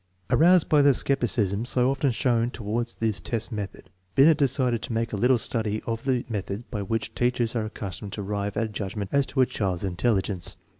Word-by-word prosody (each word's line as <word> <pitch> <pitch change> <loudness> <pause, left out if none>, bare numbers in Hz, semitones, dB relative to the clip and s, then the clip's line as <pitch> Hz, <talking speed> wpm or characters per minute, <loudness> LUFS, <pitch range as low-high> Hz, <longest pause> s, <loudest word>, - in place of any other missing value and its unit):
1 - - +3
Aroused 175 +1 +6
by 150 -2 +5
the 140 -2 +5
skepticism 110 -7 +1
so 125 +1 +2
often 135 +1 +1
shown 120 -1 +1
toward 115 +1 -3
his 110 -2 0
test 115 +1 -3
method, 105 -3 -6 0.2
Binet 150 +3 +6
decided 130 -4 +1
to - - -4
make 115 0 -1
a - - +1
little 125 +5 +3
study 110 -2 -2
of 115 0 -3
the 130 -3 0
methods 105 -1 -4
by 105 - -3
which 110 +3 -2
teachers 120 -1 0
are 110 -2 0
accustomed 100 -2 -6
to 105 - -4
arrive 100 0 -3
at 115 - +1
a - - -5
judgment 100 -1 -5
as 140 -1 +3
to 130 - +1
a - - +6
child's 95 -6 -2
intelligence. 95 -1 -1
115 Hz, 205 wpm, -26 LUFS, 105-125 Hz, 0.2 s, Aroused